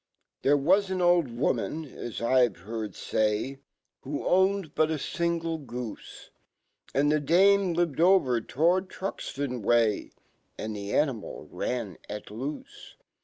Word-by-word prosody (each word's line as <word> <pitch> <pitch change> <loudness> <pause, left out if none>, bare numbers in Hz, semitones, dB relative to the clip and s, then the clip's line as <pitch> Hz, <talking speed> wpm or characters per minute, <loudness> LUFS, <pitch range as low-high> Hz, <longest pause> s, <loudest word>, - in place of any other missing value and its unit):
\ - - -54
1 - - +1
here 145 - +6
wa* 180 +8 +4
an 190 -1 -2
old 175 -3 +4
woman, 135 +6 -1
as 120 -4 -7
I've/ 120 -4 +3
heard 110 0 -5
fny, 110 +9 -1 0.4
Who 140 +2 -5
owned 190 -3 +2
butafingle/goob. 160 - -2 1.0
Andfhe 145 +2 +2
dame 195 +1 +5
lived 170 -4 0
over 165 -10 +4
towardTruxtonway, 135 - 0 0.5
Andihe 105 -2 -5
animal 135 -6 -1
ran. 115 -9 -3
at 105 0 -6
loofc 130 +8 -7
140 Hz, 110 wpm, -28 LUFS, 115-170 Hz, 1.0 s, here